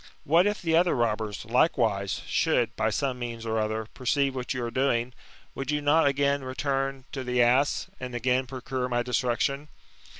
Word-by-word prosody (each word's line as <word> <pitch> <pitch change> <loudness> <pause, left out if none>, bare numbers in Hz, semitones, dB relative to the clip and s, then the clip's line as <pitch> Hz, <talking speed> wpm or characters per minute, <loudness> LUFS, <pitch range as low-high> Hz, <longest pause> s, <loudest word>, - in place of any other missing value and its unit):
What 165 +5 +4
if 205 -2 -2
the 165 -1 +2
other 175 +1 +3
robbers, 110 -3 -1
likewise, 115 - +1
should, - - +1
by 110 0 +1
some 130 +3 -1
means 115 -1 -5
or 110 0 0
other, 110 +1 -1
perceive 135 +2 0
what 125 -2 -4
you 125 -1 -2
are 115 - -4
doing, 125 -1 0 0.4
would 135 0 -5
you 150 0 +1
not 145 +2 +3
again 140 0 +1
i - - -9
eturn 135 0 -2
to 135 - -4
the 125 0 -1
ass, 125 +4 +3
and 125 -1 -6
again 125 +2 +1
procure 130 0 -4
my 120 0 0
destruction 125 +4 0
130 Hz, 180 wpm, -27 LUFS, 120-140 Hz, 0.4 s, What